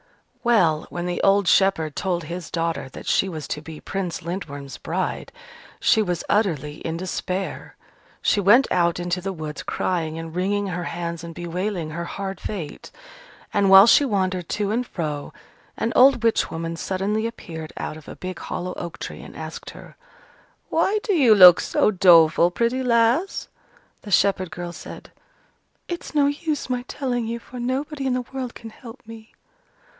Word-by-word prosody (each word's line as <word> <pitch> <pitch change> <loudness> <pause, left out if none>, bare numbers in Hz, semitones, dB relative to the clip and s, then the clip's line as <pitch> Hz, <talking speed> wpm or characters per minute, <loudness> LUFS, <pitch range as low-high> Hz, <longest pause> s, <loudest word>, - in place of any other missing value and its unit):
Well, 175 -11 +3
when 175 0 -4
the 180 0 -2
old 195 -1 +3
shepherd 165 -7 +3
told 180 -3 -1
his 170 +2 -6
daughter 165 -5 -2
that - - -10
she 195 - +2
was 155 -5 -6
to 150 - -3
be 160 -1 -9
Prince 185 -5 -4
Lindworm's 145 -6 -6
bride, - - -3 0.5
she 220 - +4
was 180 -4 -2
utterly 155 -8 0
in 165 0 -4
despair. 185 +1 -4 0.5
She - - +3
went 210 +7 +6
out 170 -1 +2
into 175 +1 -2
the 195 +2 -3
woods, 155 -4 -6
crying 165 -3 -2
and 165 0 -7
wringing 200 +3 0
her 180 -2 -3
hands 170 0 -4
and 165 -1 -8
bewailing 175 -1 -3
her 170 +2 -4
hard 195 +1 -5
fate. 180 -8 -6 0.6
And 200 -1 +3
while 195 +1 +10
she 235 - +6
wandered 185 - -1
to 205 -1 -1
and 245 +3 -1
fro, 150 -4 -4 0.5
an 230 - -1
old 255 -2 +6
witch 230 -1 +2
woman 165 0 -4
suddenly 200 +6 -1
appeared 160 -8 -8
out - - -4
of 155 -2 -13
a - - -8
big 185 -1 -6
hollow 180 +1 -4
oak 170 -1 -6
tree, - - -7
and - - -12
asked - - -7
her, - - -13 0.7
"Why 380 +6 +2
do 415 - 0
you 260 - +6
look 180 -3 +10
so - - +2
doleful, 170 -3 +6
pretty 235 +7 0
lass?" 240 - +2 0.5
The 210 - -10
shepherd 190 -2 +2
girl 175 0 -6
said, - - -10 0.8
"It's 345 -2 -6
no 290 -1 +4
use 295 +1 -2
my 250 -1 0
telling 245 -5 -2
you, 230 +1 -3
for 245 +1 -10
nobody 270 +3 -2
in 260 - +1
the 250 -1 -2
world 255 -2 -4
can 225 - -10
help 230 +2 -12
me." 225 0 -12
190 Hz, 170 wpm, -23 LUFS, 170-230 Hz, 0.8 s, while